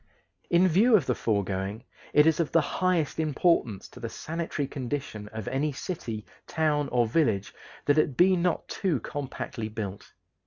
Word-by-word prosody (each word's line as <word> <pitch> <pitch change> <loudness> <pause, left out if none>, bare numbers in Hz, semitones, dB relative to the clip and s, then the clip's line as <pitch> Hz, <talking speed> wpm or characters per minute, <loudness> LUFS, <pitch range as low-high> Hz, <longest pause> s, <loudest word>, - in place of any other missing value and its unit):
In 175 +2 +5
view 215 +8 +5
of 175 -10 +3
the - - +1
foregoing, 100 0 -1 0.3
it 150 - +6
is 160 0 +3
of 165 - 0
the 165 - +5
highest 165 +1 0
importance 150 - +1
to - - -13
the 115 -2 -4
sanitary 160 -2 -3
condition 130 -6 -4
of 110 -1 -7
any 140 +4 0
city, 125 - -5 0.2
town, 150 -3 +1
or 120 -1 +3
village 110 -6 +1 0.3
that 145 +1 +4
it 145 -4 +1
be 185 +1 +6
not 175 -1 0
too 175 -9 0
compactly 130 -5 -5
built. 105 -3 -6
145 Hz, 160 wpm, -28 LUFS, 110-165 Hz, 0.3 s, it